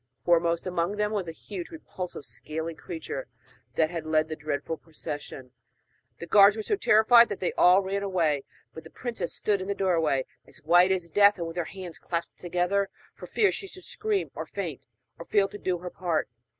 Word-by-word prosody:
Foremost 170 -1 +2
among 180 +1 -1
them 210 0 0
was 200 -5 -2
a - - -3
huge, 180 +2 -8
repulsive 180 - -7
scaly 155 +8 -5
creature 160 -5 -6 0.5
that 165 0 0
led 155 0 +1
the 155 - -3
dreadful 150 +1 -3
procession. 145 -5 -8 0.7
The - - -7
guards 200 +4 +6
were 220 - -3
so 415 - +1
terrified 235 - +6
that 205 - -4
they 180 - -1
all 185 +2 +5
ran 195 +1 -2
away; 165 -8 +1 0.3
but 160 - -9
the 160 - -12
princess 240 +4 -4
stood 205 -2 0
in 190 - -5
the 200 - -1
doorway, 165 -9 +1 0.2
as - - -16
white 175 +4 +5
as 180 -3 0
death, 200 +4 +5
and 170 - -3
with 165 +1 -7
her 175 - 0
hands 185 -1 -8
clasped 170 -1 -4
tight - - -21
together 180 +3 0 0.2
for - - -10
fear 415 -3 +3
she 390 - -4
should 370 -1 -11
scream 425 -1 -2
or - - -6
faint, - - -5 0.3
and - - -9
fail 200 -2 +3
to 205 - -9
do 185 -1 -1
her 180 +1 -7
part. 170 -3 -1
180 Hz, 200 wpm, -27 LUFS, 160-200 Hz, 0.7 s, guards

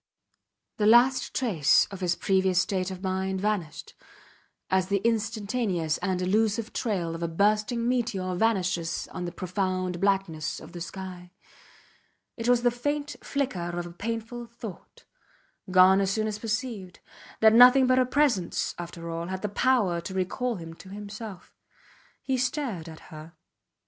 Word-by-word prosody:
The 210 - +2
last 245 +4 +5
trace 185 - +3
of 195 - -7
his 175 -2 0
previous 190 -1 +2
state 185 -1 0
of 185 0 -8
mind 190 0 -1
vanished, 200 -6 -3 0.8
as 190 -1 +2
the 200 +1 +1
instantaneous 215 -6 0
and 185 -1 -1
elusive 220 +3 +1
trail 185 -8 -1
of 165 - -6
a 170 - 0
bursting 210 +6 +1
meteor 220 -7 -1
vanishes 185 -5 0
on 180 - -5
the 175 - -4
profound 185 -1 -2
blackness 190 -6 0
of 155 - -12
the 175 - -8
sky; 180 0 -7 1.1
it 230 0 -2
was 245 -1 +4
the 245 - +4
faint 290 +4 -3
flicker 180 -11 -2
of 175 - -3
a 175 - -8
painful 230 +5 -5
thought, 230 -4 -11 0.6
gone 185 +1 +6
as 195 - +1
soon 215 +2 0
as 210 -1 -3
perceived, 215 -4 -4 0.4
that 220 0 +6
nothing 250 +3 +8
but 255 0 +4
her 255 - +4
presence 255 -10 +1
after 170 -1 -7
all 165 +1 -4
had 190 +1 -5
the 210 - -1
power 205 -6 +2
to 190 +2 -7
recall 230 +6 -1
him 165 -3 -8
to 185 +3 -14
himself. 205 -1 -9 0.7
He 260 -1 0
stared 250 - -2
at 160 - -11
her. 155 +2 -10
195 Hz, 155 wpm, -27 LUFS, 180-230 Hz, 1.1 s, nothing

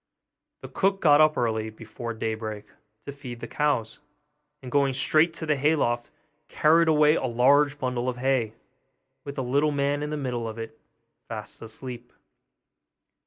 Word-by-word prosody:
The - - -6
cook 195 0 0
got 150 -3 +5
up 155 0 +4
early, 110 -2 0
before 115 +2 -7
daybreak, 110 -1 -4 0.4
to 140 - -5
feed 130 -4 -9
the - - -6
cows; 145 -7 -1 0.6
and 125 - -8
going 140 -2 +2
straight 155 +4 +3
to 160 - -5
the 150 -1 +2
hay 145 +3 +2
loft, 120 -4 -1 0.4
carried 165 +2 +3
away 150 -1 +5
a - - -2
large 145 +5 +3
bundle 125 -2 -2
of 125 - -4
hay, 125 -4 0 0.7
with 140 -1 -6
the 135 - -2
little 140 +5 +2
man 140 0 0
in 150 - -3
the 150 - -3
middle 125 -5 -3
of 110 - -8
it, 115 0 -7 0.5
fast - - -6
asleep. 120 +2 -8
130 Hz, 165 wpm, -26 LUFS, 115-150 Hz, 0.7 s, got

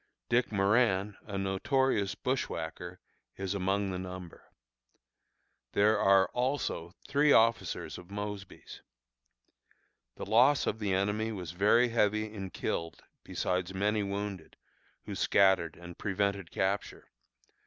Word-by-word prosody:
Dick 120 0 +2
Moran 100 -1 +2
(a 100 -2 -4
notorious 100 +2 0
bushwhacker) 90 -7 -4 0.4
is 95 0 -3
among 100 0 0
the 90 - -3
number. 90 -2 -9 1.2
There 105 +1 +3
are 95 -2 +5
also 125 -9 -2
three 145 +1 +3
officers 115 -5 +2
of 90 +1 -14
Mosby's. 100 -1 -7 1.3
The - - -6
loss 125 +7 +4
of 110 - -2
the 105 -3 -1
enemy 105 +4 0
was 90 -6 -6
very 105 +7 +3
heavy 110 -1 +1
in 95 -3 -6
killed, 85 -1 -4 0.2
besides 90 +1 -2
many 105 +2 +1
wounded, 100 -3 -5 0.5
who - - -6
scattered 95 -3 +3
and 85 0 -10
prevented 100 -3 -1
capture. 100 +2 -2
100 Hz, 115 wpm, -31 LUFS, 95-110 Hz, 1.3 s, are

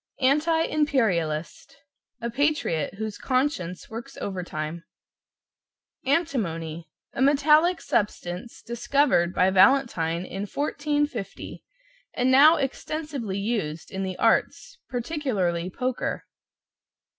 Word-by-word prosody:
=ANTI 305 +5 +3
IMPERIALIST= 215 - 0 0.4
A 235 0 -3
patriot 270 - 0
whose 215 0 -5
conscience 255 - -1
works 230 +2 -8
overtime. 170 -4 -4 1.2
=ANTIMONY= 170 - -1 0.2
A - - -3
metallic 300 +5 +4
substance 190 +1 -3
discovered 240 -6 +2
by 185 +1 +3
Valentine 185 -6 +3
in 195 +2 -5
1450, 290 -2 -3 0.5
and 250 +1 +2
now 295 +5 +8
extensively 275 - -3
used 200 -7 -3
in 190 - -4
the 185 -1 -3
arts - - +1
particularly 235 - -1
poker. 250 +6 -3
235 Hz, 90 wpm, -25 LUFS, 180-285 Hz, 1.2 s, now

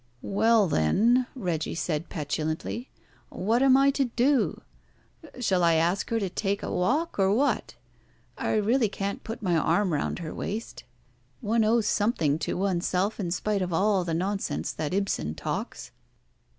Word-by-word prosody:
"Well, 220 +1 +3
then," 225 - +3
Reggie 175 -10 -2
said 165 -1 -2
petulantly, 155 - -3 0.4
"what 225 +6 0
am 265 -1 +6
I 275 +1 +5
to 275 0 +1
do? 250 +3 +1 0.8
Shall 190 -7 +1
I 170 -1 +4
ask 170 +4 +1
her 230 - +1
to 200 - -1
take 200 +2 -2
a - - -3
walk, 270 - 0
or 190 0 +4
what? 270 +7 0 0.6
I - - -1
really 220 +2 +2
can't 200 0 -4
put 225 0 -7
my 180 -3 +1
arm 170 +3 +2
round 145 - -1
her 165 -3 -6
waist. 220 +3 -5 0.5
One 225 -1 +1
owes 220 0 +2
something 205 -9 +1
to - - -2
oneself 190 +2 0
in 180 -4 -2
spite 200 +3 -1
of 180 -1 -2
all 195 +2 +2
the 165 -2 -2
nonsense 180 - -2
that 155 - -4
Ibsen 190 - -1
talks." - - -5
200 Hz, 155 wpm, -27 LUFS, 170-230 Hz, 0.8 s, am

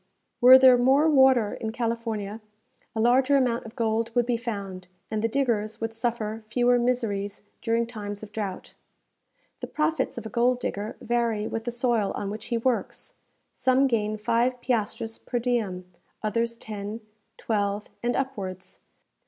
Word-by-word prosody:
Were 255 +2 +10
there 260 -1 +7
more 270 +5 +4
water 265 -7 +5
in 220 - -4
California, 225 -3 -3 0.5
a - - -1
larger 255 +4 +4
amount 240 -3 0
of 225 - -13
gold 230 -1 0
would 240 -1 +3
be 245 0 +1
found, 200 -6 -5 0.2
and 215 -1 -1
the 230 - +2
diggers 230 -4 -1
would 225 0 -3
suffer 225 -1 -3
fewer 245 +2 +3
miseries 225 -6 -1 0.2
during 230 0 +1
times 205 -3 -7
of 210 - -9
drought. 205 -4 -5 0.9
The - - -5
profits 310 -2 -1
of 230 - -6
a - - -4
gold 245 +2 +2
digger 210 -3 -4
vary 230 -3 0
with 225 0 -4
the 240 - -1
soil 235 -4 0
on 200 -1 -3
which 215 +1 -7
he 235 - -1
works. 240 +1 -2 0.4
Some 260 +1 +3
gain 215 -4 0
five 235 +4 +1
piastres 225 -2 -2
per 245 - -3
diem, 225 -7 -1 0.4
others 230 +2 0
ten, 215 0 -6 0.4
twelve, 205 -1 -1
and 240 +1 0
upwards. 195 -9 -4
230 Hz, 155 wpm, -26 LUFS, 215-245 Hz, 0.9 s, Were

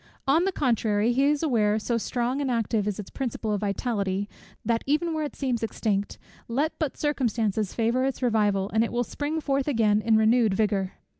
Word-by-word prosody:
On 320 +6 +4
the 390 - +1
contrary, 230 - +1
he 270 +3 +3
is 295 +1 +1
aware, 215 -8 +2
so 220 +2 -1
strong 245 +4 -1
and 275 - -1
active 225 -3 0
is 210 - -2
its 205 - -8
principle 235 -4 -3
of 205 - -2
vitality, 200 -1 -1 0.4
that 230 0 +1
even 320 +4 +1
where 310 -1 -1
it 295 - -5
seems 255 -4 -1
extinct, 205 -2 -2 0.3
let 285 +7 0
but 310 -5 -2
circumstances 225 -8 -1
favour 235 +3 +1
its 270 0 -2
revival, 205 -4 +1
and 220 +1 +3
it 230 - -2
will 240 0 0
spring 295 +6 -3
forth 275 -2 -1
again 215 -6 +2
in 220 0 +3
renewed 220 -1 +3
vigour. 200 -3 0
230 Hz, 195 wpm, -26 LUFS, 210-270 Hz, 0.4 s, On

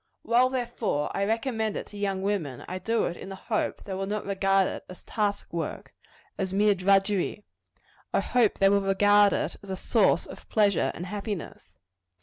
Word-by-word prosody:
While, 245 +2 +4
therefore, 240 - -2
I 200 - +1
recommend 225 0 -1
it - - -5
to - - -13
young 195 -2 -1
women, 170 -11 -2
I 185 +1 -4
do 225 +5 0
it 170 - -2
in 190 - -9
the 195 - -6
hope 215 +3 -2
that - - -17
they 195 - -5
will 195 +1 -3
not 210 +1 -3
regard 195 -1 +2
it - - -5
as 180 - -11
task 205 -5 -2
work 165 -3 -4 0.5
as 190 -1 -1
mere 205 +2 +4
drudgery. 195 +1 +1 0.7
I - - +2
hope 240 -4 +2
they 195 - +5
will 200 0 +3
regard 205 +1 +5
it - - -2
as 200 - -12
a 190 - -2
source - - +2
of - - -12
pleasure 205 -4 +3
and 175 - -5
happiness. 205 -2 -6
200 Hz, 190 wpm, -27 LUFS, 190-210 Hz, 0.7 s, they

